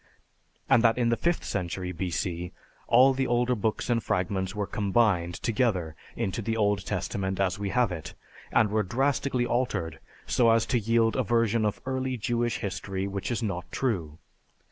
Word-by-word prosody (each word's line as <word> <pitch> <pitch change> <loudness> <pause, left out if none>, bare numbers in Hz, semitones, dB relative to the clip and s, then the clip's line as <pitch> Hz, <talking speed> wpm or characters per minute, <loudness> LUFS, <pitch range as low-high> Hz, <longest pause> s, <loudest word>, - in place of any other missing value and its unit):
and 115 - +5
that 115 0 +4
in 120 -2 +2
the 115 - +3
fifth 170 +7 0
century 90 -1 -3
B.C. 90 0 -3 0.4
all 130 +3 +6
the 130 0 -1
older 120 +1 +2
books 110 -1 -1
and 120 -2 +1
fragments 95 +1 -1
were 105 -1 -1
combined 100 -5 +1
together 105 -9 0 0.2
into 100 +4 -2
the 115 +1 -2
Old 105 -2 +1
Testament 95 -1 -2
as 95 0 0
we 100 -1 -2
have 125 -2 +2
it, 85 -3 -6 0.4
and 105 -2 +3
were 110 0 +2
drastically 130 +4 0
altered 110 - -1 0.3
so 120 -2 +3
as 115 0 +4
to 125 - +1
yield 115 +1 +2
a 130 - +2
version 115 -1 +2
of 105 - -1
early 130 -1 -2
Jewish 120 +1 -1
history 95 0 -3
which 100 -1 -4
is 120 -1 -2
not 95 -4 -4
true. 85 - -2
110 Hz, 170 wpm, -27 LUFS, 95-120 Hz, 0.4 s, all